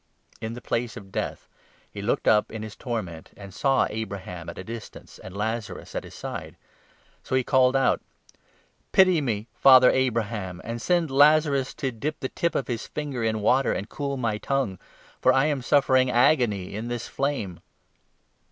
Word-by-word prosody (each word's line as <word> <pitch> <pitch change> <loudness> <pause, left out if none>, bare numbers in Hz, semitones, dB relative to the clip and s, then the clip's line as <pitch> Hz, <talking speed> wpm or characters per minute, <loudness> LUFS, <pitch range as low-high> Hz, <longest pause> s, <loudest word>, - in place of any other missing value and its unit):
In 110 +1 -4
the 120 - -8
Place 115 -1 -2
of 95 -1 -11
Death - - -4 0.4
he - - -7
looked - - -1
up 105 -1 +4
in 110 -1 -6
his 110 -1 -8
torment, 105 - -5
23 - - -12
and 95 -1 -10
saw 135 +4 +2
Abraham 95 -5 -6
at 85 - -9
a - - -6
distance 115 +2 -9
and 95 +1 -10
Lazarus 110 +1 -4
at - - -3
his - - -12
side. - - -7 0.6
So - - -3
he 130 - +2
24 - - -30
called 130 -1 +5
out 135 - +2 0.5
' - - -38
Pity 185 -4 +5
me, 110 -6 -2
Father 130 -2 +7
Abraham, 110 -7 -1
and 115 0 -5
send 170 -2 +1
Lazarus 145 -1 +4
to 135 - -2
dip 145 +7 -4
the 130 - -3
tip 170 -2 -1
of 135 - -1
his 120 -3 -4
finger 145 -6 -4
in 110 -1 0
water 130 +6 +3
and 100 - -4
cool 140 -1 -3
my 115 -4 -1
tongue, 135 -9 -1 0.4
for - - +5
I 135 +2 +3
am 145 -3 0
suffering 130 0 +3
agony 120 -7 +2
in 110 +3 -4
this 120 -1 -4
flame.' 130 - -2
120 Hz, 185 wpm, -25 LUFS, 105-135 Hz, 0.6 s, Father